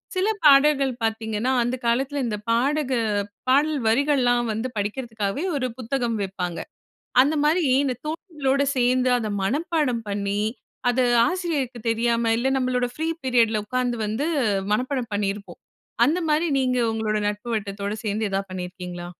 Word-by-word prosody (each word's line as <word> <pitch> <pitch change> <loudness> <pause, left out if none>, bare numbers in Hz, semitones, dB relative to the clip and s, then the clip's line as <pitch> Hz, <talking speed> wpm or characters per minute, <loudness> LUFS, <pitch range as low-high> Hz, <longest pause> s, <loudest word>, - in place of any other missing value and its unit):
சில 370 +2 +1 0.2
பாடல்கள் 280 -1 +6
பார்த்தீங்கன்னா, 220 +2 -1
அந்த 240 +2 -1
காலத்தில 270 +4 0
இந்த 215 -3 -2
பாடக 270 +4 +1 0.6
பாடல் 290 +3 +3
வரிகள்லாம் 245 -1 +2
வந்து 225 +4 -2
படிக்கிறதுக்காகவே 215 - -3
ஒரு 260 -3 0
புத்தகம் 240 -2 -1
விப்பாங்க. 180 -3 -4 0.6
அந்தமாரி 300 +4 +2 0.2
இந்த 260 -2 0
தோழிகளோட 300 -4 -1
சேர்ந்து 250 +1 +2
அத 225 - -3 0.2
மனப்பாடம் 285 - 0
பண்ணி, 200 0 -1 0.5
அது 250 +1 +1 0.3
ஆசிரியருக்கு 300 -10 -2
தெரியாம, 230 0 +1
இல்ல 255 +3 +1
நம்மளோட 250 -1 0
ஃப்ரீ 320 +1 -2 0.2
பீரியட்‌ல 230 -4 +2
உட்கார்ந்து 250 +1 -1
வந்து 220 +8 -2 0.5
மனப்பாடம் 250 0 -1
பண்ணியிருப்போம். 200 0 -3 0.5
அந்தமாரி, 320 0 +1
நீங்க 255 -1 +1
உங்களோட 220 -1 -1
நட்பு 210 +3 -5
வட்டத்தோட 200 -1 -3
சேர்ந்து 215 0 -1
ஏதாவது 195 0 -2
பண்ணிருக்கிறீங்களா? 180 -1 -6
245 Hz, 125 wpm, -24 LUFS, 215-275 Hz, 0.6 s, பாடல்கள்